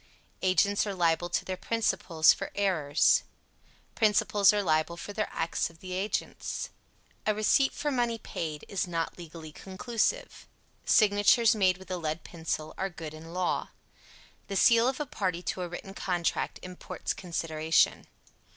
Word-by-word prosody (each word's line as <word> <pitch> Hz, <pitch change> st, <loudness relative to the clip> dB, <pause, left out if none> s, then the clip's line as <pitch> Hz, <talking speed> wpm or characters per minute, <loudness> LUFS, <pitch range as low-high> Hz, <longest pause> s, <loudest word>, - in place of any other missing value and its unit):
Agents 200 Hz, +3 st, +2 dB
are 200 Hz, -, -3 dB
liable 175 Hz, -1 st, +1 dB
to -, -, -1 dB
their 185 Hz, -, -3 dB
principals 185 Hz, -6 st, +2 dB
for -, -, -5 dB
errors. 165 Hz, -8 st, +3 dB, 0.7 s
Principals 210 Hz, -2 st, +4 dB
are 205 Hz, -1 st, 0 dB
liable 155 Hz, 0 st, +1 dB
for 205 Hz, -, -7 dB
the 215 Hz, +1 st, -2 dB
acts 165 Hz, +1 st, -1 dB
of 165 Hz, -1 st, -19 dB
their 185 Hz, +1 st, -9 dB
agents. 190 Hz, +3 st, -3 dB, 0.6 s
A 215 Hz, -, +3 dB
receipt 215 Hz, +6 st, +3 dB
for 295 Hz, -, -2 dB
money 240 Hz, -3 st, 0 dB
paid 155 Hz, -7 st, -5 dB
is 195 Hz, -2 st, -2 dB
not 165 Hz, 0 st, -3 dB
legally 165 Hz, -2 st, -9 dB
conclusive. 230 Hz, -, -2 dB, 0.4 s
Signatures 215 Hz, +2 st, +5 dB
made 185 Hz, -3 st, +3 dB
with 190 Hz, 0 st, -12 dB
a 185 Hz, -, -1 dB
lead 155 Hz, -1 st, -3 dB
pencil 160 Hz, -2 st, -4 dB
are 195 Hz, -, -1 dB
good 160 Hz, -4 st, -8 dB
in 160 Hz, +1 st, -10 dB
law. 180 Hz, +1 st, -1 dB, 0.8 s
The 200 Hz, -, -4 dB
seal 230 Hz, +3 st, +5 dB
of 260 Hz, +2 st, -1 dB
a 295 Hz, -, -1 dB
party 185 Hz, -8 st, -2 dB
to 185 Hz, -, -3 dB
a 180 Hz, -, -2 dB
written 185 Hz, +3 st, -8 dB
contract 175 Hz, -4 st, -1 dB
imports 180 Hz, 0 st, -5 dB
consideration. 160 Hz, -3 st, 0 dB
185 Hz, 150 wpm, -29 LUFS, 165-210 Hz, 0.8 s, Signatures